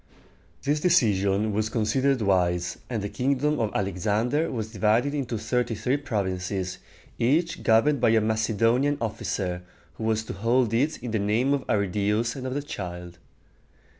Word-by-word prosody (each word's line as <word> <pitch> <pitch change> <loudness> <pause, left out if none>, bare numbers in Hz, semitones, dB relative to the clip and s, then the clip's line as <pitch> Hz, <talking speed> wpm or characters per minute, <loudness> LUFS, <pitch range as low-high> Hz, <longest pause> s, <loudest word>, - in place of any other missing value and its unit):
This 145 +2 +1
decision 105 - +2
was 110 +1 0
considered 130 +3 +1
wise, 90 -3 +1
and 115 -5 -2
the - - -1
kingdom 140 +5 0
of 110 - +1
Alexander 105 - 0
was 110 -3 -4
divided 110 +6 +2
into 130 -5 -2
thirty 120 +1 -1
three 125 +6 0
provinces, 95 -6 -3 0.4
each 155 +8 +1
governed 120 +5 +3
by - - +4
a 110 0 +4
Macedonian 115 +5 +1
officer, 95 -5 -3 0.4
who - - -4
was 110 0 +1
to - - -6
hold 115 +3 +1
it 145 +7 +1
in 120 - -4
the 110 - 0
name 110 +7 +1
of 140 -2 -2
Arridæus 105 +3 0
and 130 -1 -5
of 130 - -3
the 145 - -2
child. 90 -7 -7
110 Hz, 155 wpm, -26 LUFS, 100-130 Hz, 0.4 s, by